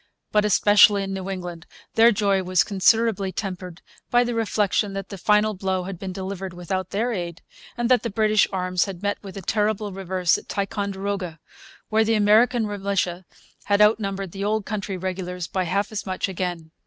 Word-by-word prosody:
But, 210 0 +3
especially 205 0 +5
in 195 0 -4
New 190 0 -5
England, 175 -3 -6 0.3
their 230 +1 +6
joy 200 -2 +1
was 185 -1 +2
considerably 205 0 +2
tempered 185 -3 -6 0.3
by 245 0 +4
the 240 0 -2
reflection 210 -2 0
that 195 -1 -5
the 200 - -7
final 210 +3 +3
blow 190 -1 -2
had 185 -1 -7
been 190 -1 -5
delivered 190 0 -5
without 180 +1 -3
their 230 +4 -1
aid, 175 -3 -5 0.3
and 240 0 0
that 250 0 +4
the 235 - -3
British 215 0 +3
arms 180 -2 0
had 190 -1 -8
met 205 0 -1
with 195 -1 -9
a 195 - -7
terrible 210 +1 0
reverse 185 -2 0
at - - -19
Ticonderoga, 195 -3 -3 0.5
where 220 +1 +3
the 225 0 +2
American 220 +3 +4
militia 195 -3 -2 0.4
had 205 0 +2
outnumbered 195 -3 +2
the 195 +2 -5
old 210 0 0
country 200 -2 -4
regulars 180 -1 -4
by 185 +1 -2
half 200 +5 -1
as 215 - -3
much 185 0 -2
again. 175 -4 -4
195 Hz, 180 wpm, -23 LUFS, 185-210 Hz, 0.5 s, their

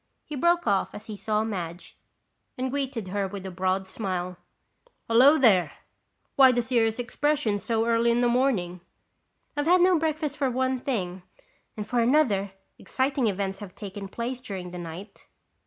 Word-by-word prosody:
He 300 - -6
broke 345 +5 +2
off 200 -3 0
as 210 - -9
he 215 -2 -7
saw 215 +1 -1
Madge 180 -5 -5 0.6
and 255 0 -2
greeted 265 -8 -3
her 200 0 -1
with 195 0 -8
a 190 - -5
broad 185 +1 -1
smile. 185 -2 -4 0.7
"Hello, 260 +7 +6
there. 190 - +4 0.6
Why 265 -2 +7
the 245 -1 0
serious 230 -2 +1
expression 255 -3 0
so 225 +1 0
early 230 0 +2
in 235 +1 +2
the 245 - +3
morning?" 230 -9 0 0.7
"I've 290 +1 -1
had 360 +1 +5
no 360 -2 +5
breakfast 310 -2 -2
for 275 -2 +1
one 260 +1 0
thing. 190 -9 -3 0.6
And 210 0 -5
for 245 +2 0
another, 230 -6 +3 0.3
exciting 265 -2 0
events 195 -1 -2
have 200 -3 -10
taken 200 -1 -7
place 240 +5 -5
during 190 -7 -6
the 180 - -7
night." 175 +4 -9
230 Hz, 165 wpm, -26 LUFS, 195-260 Hz, 0.7 s, Why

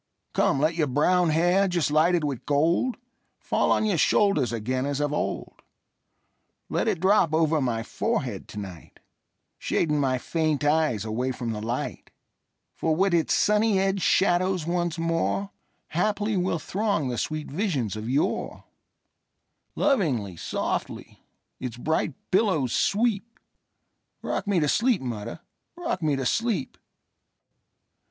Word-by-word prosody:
Come, 135 - +2
let 155 +3 +2
your 160 -2 0
brown 170 +6 +2
hair, 175 +5 +3
just 175 -5 0
lighted 165 +2 +3
with 140 -5 -3
gold, 165 - +2 0.4
Fall - - 0
on - - +2
your 195 -6 +1
shoulders 175 - +3
again 125 +3 -2
as 145 0 -2
of 145 0 0
old; - - -3 1.1
Let - - 0
it 205 -6 +1
drop 185 -4 +3
over 160 -1 +2
my 115 -3 -1
forehead 130 - -2
to - - -11
night, 95 -5 -9 0.6
Shading 150 -3 0
my 130 -2 +1
faint 155 +1 -1
eyes 145 -8 +2
away 120 +4 -1
from 120 -2 -4
the 105 -1 -4
light; 115 +3 -4 0.6
For 160 -1 0
with 190 +2 +2
its 165 -2 +2
sunny 210 0 +3
edged 195 0 +1
shadows 185 -2 +2
once 175 -1 -1
moreHaply 195 +4 -2
will 180 -2 0
throng 190 -4 -1
the 120 - -3
sweet 155 -2 -3
visions 145 - -1
of 110 +2 -5
yore; 140 +4 -1 1.1
Lovingly, 135 - +1
softly, - - -4 0.4
its 125 -3 -5
bright 160 +1 -1 0.2
billows 185 - +2
sweep;—Rock 225 0 -3
me 200 -3 +2
to 150 - +2
sleep, 225 - +2
mother,—rock 130 - -6
me 150 -3 +1
to 135 -1 -3
sleep! 220 - -1
160 Hz, 130 wpm, -26 LUFS, 130-190 Hz, 1.1 s, hair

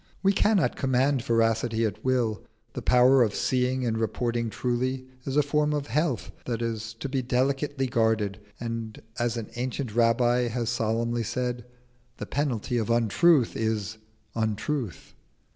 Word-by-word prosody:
We 195 +1 +4
cannot 205 -1 +2
command 135 0 +1
veracity 115 -1 +1
at 110 0 -4
will: 120 -4 +1 0.3
the - - -5
power 125 +1 +5
of 110 -4 +2
seeing 130 0 0
and 110 -1 0
reporting 115 +1 -1
truly 130 +3 -2 0.2
is 135 +1 -2
a 150 - +5
form 150 +1 +1
of 145 -1 -1
health 145 +1 -1
that 115 -3 -2
has 115 -1 -3
to - - -2
be 135 -1 -1
delicately 135 +2 0
guarded, 110 -5 +1 0.2
and 115 -2 -5 0.2
as 120 0 0
an 110 -3 -6
ancient 125 -1 -3
Rabbi 120 +1 +3
has 120 0 -2
solemnly 115 +1 0
said, 125 +1 -3 0.5
"The - - -5
penalty 125 -4 -1
of 110 - -2
untruth 120 - +3
is 110 -1 -2 0.3
untruth." 110 - -3
120 Hz, 145 wpm, -27 LUFS, 115-130 Hz, 0.5 s, power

